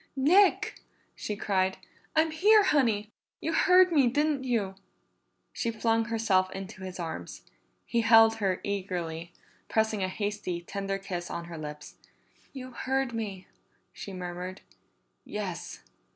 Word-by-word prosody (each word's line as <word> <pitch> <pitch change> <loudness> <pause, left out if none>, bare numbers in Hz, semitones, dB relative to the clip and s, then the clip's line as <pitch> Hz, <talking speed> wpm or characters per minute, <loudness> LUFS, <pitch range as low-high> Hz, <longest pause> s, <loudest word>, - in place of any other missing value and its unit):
"Nick!" 355 +9 +4 0.4
she 210 - -4
cried. 190 -2 0 0.4
"I'm 320 0 +3
here, 415 +7 +5
Honey. 225 - +2 0.3
You 325 - -2
heard 365 +1 +6
me, 285 -6 +4
didn't 290 +2 +1
you?" 220 -6 0 0.8
She 230 - -1
flung 225 0 +1
herself 220 -5 +2
into 195 +1 -8
his 185 -1 -7
arms; 160 - -6 0.4
he 235 - +1
held 225 0 +6
her 195 -4 0
eagerly, 175 -4 -3 0.4
pressing 220 -2 +1
a 185 - +1
hasty, 205 -2 -3
tender 195 +2 -3
kiss 180 -3 -5
on 170 - -5
her 170 -1 -8
lips. 150 -1 -8 0.5
"You 255 -2 -8
heard 265 0 -1
me!" 200 -5 -4 0.5
she 200 - -8
murmured. 180 0 -6 0.6
"Yes." 195 -5 -6
210 Hz, 130 wpm, -29 LUFS, 185-250 Hz, 0.8 s, heard